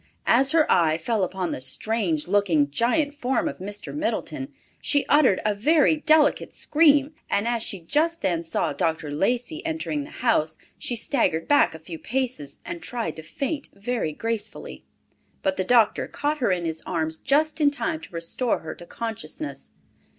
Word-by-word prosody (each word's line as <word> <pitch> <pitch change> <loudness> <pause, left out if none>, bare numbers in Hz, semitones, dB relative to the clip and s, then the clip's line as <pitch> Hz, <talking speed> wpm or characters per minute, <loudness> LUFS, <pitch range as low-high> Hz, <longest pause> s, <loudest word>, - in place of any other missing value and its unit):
As 265 +4 +4
her 320 -1 +4
eye 160 -2 +3
fell 210 +4 0
upon 185 -1 -2
the - - -4
strange 175 - -1
looking, 175 -8 +2
giant 285 - +1
form 265 -3 0
of - - -5
Mr. 205 +2 -6
Middleton, 290 0 -3 0.3
she 285 -1 +1
uttered 285 -10 +4
a 210 - +3
very 300 +8 +3
delicate 310 0 +3
scream, 295 -2 +3 0.2
and 205 +3 +1
as 235 -1 0
she 200 -3 -2
just 315 - 0
then 170 -3 +1
saw 165 - -1
Dr. 160 -4 -1
Lacey 245 - -1
entering 320 -2 -2
the 290 - -10
house, 160 -10 +1 0.2
she 245 - -2
staggered 190 - 0
back 290 - +4
a - - -9
few 160 0 -9
paces, 240 - -3
and 340 0 -6
tried 240 -5 -3
to - - -6
faint 275 - -4
very 220 -4 -2
gracefully. 220 +5 -4 0.6
But 190 0 0
the 185 - +1
doctor 230 +1 +3
caught 300 +1 -2
her 235 -6 +2
in 175 -2 0
his 160 -1 -3
arms 160 -2 -2
just 310 +3 +1
in 290 - +6
time 315 +2 -3
to - - -11
restore 170 +8 -1
her 160 - -6
to 175 - -13
consciousness! 230 +6 -6
230 Hz, 170 wpm, -25 LUFS, 175-290 Hz, 0.6 s, in